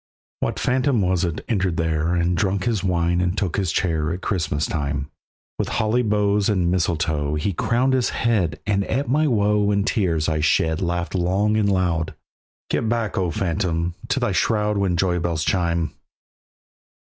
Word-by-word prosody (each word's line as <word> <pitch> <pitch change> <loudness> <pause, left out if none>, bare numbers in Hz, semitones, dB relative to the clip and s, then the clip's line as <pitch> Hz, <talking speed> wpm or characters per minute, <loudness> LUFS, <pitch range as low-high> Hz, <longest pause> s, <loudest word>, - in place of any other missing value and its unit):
What - - -2
phantom 130 -2 +1
was 90 -1 +1
it 85 -3 -3
entered 95 -7 0
there 80 +1 0
And 85 +1 +1
drank 95 +2 0
his 110 -4 0
wine 85 -1 +1
and 90 +2 -1
took 95 -6 -1
his 95 -5 0
chair 80 -3 0
At 90 +2 -4
Christmas 80 -5 -1
time? 70 -2 -3 0.5
With - - 0
holly 110 +3 +1
boughs 105 -2 +1
and 90 -4 +1
mistletoe 80 -4 0
He 75 +6 -1
crowned 125 +8 +1
his 130 -2 +2
head, 95 -11 0
and 100 -1 +1
at 135 +5 -1
my 150 +4 +3
woe 105 -4 +2
And 100 -1 +1
tears 85 -7 0
I 80 -1 0
shed 80 +2 +2
laughed 85 -1 -2
long 95 +4 +1
and 105 -2 +2
loud; 85 -4 0 0.6
"Get 110 - 0
back, 115 -2 -1
O 90 -2 0
phantom! 85 -1 -1
to - - 0
thy - - 0
shroud 105 -2 +1
When 95 -3 +1
joy 90 0 +1
bells 85 -2 -1
chime." 85 -3 0
90 Hz, 170 wpm, -22 LUFS, 85-105 Hz, 0.6 s, my